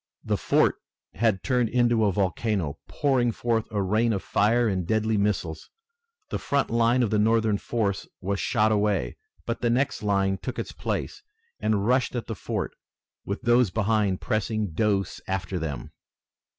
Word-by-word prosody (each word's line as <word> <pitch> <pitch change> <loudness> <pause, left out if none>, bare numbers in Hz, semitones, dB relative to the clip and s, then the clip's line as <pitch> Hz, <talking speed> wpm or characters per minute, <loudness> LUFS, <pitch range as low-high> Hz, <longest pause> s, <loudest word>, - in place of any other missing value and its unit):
The - - 0
fort - - +2 0.4
had 110 -3 +1
turned 125 -3 +1
into 120 -3 +3
a 100 - +3
volcano, 95 -4 -1
pouring 130 -4 +1
forth 115 -1 -1
a 100 -2 -1
rain 110 +4 +2
of 100 - -3
fire 115 +3 +2
and 95 -4 -1
deadly 110 +1 +1
missiles. 95 -6 -1 0.6
The - - -1
front 140 -3 0
line 115 +2 +3
of 110 - 0
the 105 - +2
Northern 110 -1 +2
force 100 -5 -2
was 100 +1 -2
shot 110 -2 +2
away, 100 - 0 0.3
but 115 - -3
the 120 - +2
next 135 +4 +1
line 100 -2 +1
took 125 +4 -5
its - - -4
place - - -4 0.4
and 105 -2 +1
rushed 125 +2 +2
at 120 - -2
the - - -4
fort - - -3 0.5
with 100 +5 -4
those 120 -2 +4
behind 105 -1 +1
pressing 110 -4 -1
close 100 +2 0
after 95 -1 -2
them. 80 -4 -5
110 Hz, 165 wpm, -26 LUFS, 100-120 Hz, 0.6 s, those